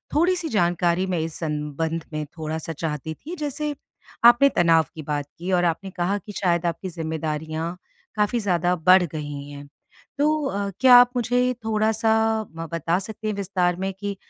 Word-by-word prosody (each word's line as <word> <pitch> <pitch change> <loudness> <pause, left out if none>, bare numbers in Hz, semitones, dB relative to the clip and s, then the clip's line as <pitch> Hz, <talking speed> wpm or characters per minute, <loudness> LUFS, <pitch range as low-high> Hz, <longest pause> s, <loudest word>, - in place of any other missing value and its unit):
थोड़ी-सी 345 0 +2
जानकारी 175 -2 +1
मैं 170 - 0
इस 160 0 -4
संबंध 155 +1 -3
में 155 0 -3
थोड़ा-सा 160 +1 -4
चाहती 155 0 -4
थी। 325 - -8
जैसे 295 -1 -3 0.5
आपने 240 +4 +7
तनाव 165 -2 +4
की 155 - -6
बात 145 -1 -2
की 180 +3 -4
और 175 -1 +3
आपने 175 +4 -1
कहा 180 +4 -1
कि 210 - -8
शायद 175 -2 +1
आपकी 170 +2 -2
ज़िम्मेदारियाँ 160 0 -4 0.4
काफ़ी 210 +3 +1
ज़्यादा 180 -4 +1
बढ़ 180 +2 +5
गई 145 -3 -6
हैं। 145 0 -10 0.5
तो 300 0 +1
अ, 200 -4 -2
क्या 255 0 +8
आप 245 0 +8
मुझे 245 +1 +1
थोड़ा-सा 220 0 +1 0.5
ब 165 0 -5
बता 165 +1 0
सकते 215 +2 -7
हैं 215 - 0
विस्तार 185 -3 0
में 190 +1 -3
कि 200 +1 -5
180 Hz, 170 wpm, -23 LUFS, 160-220 Hz, 0.5 s, क्या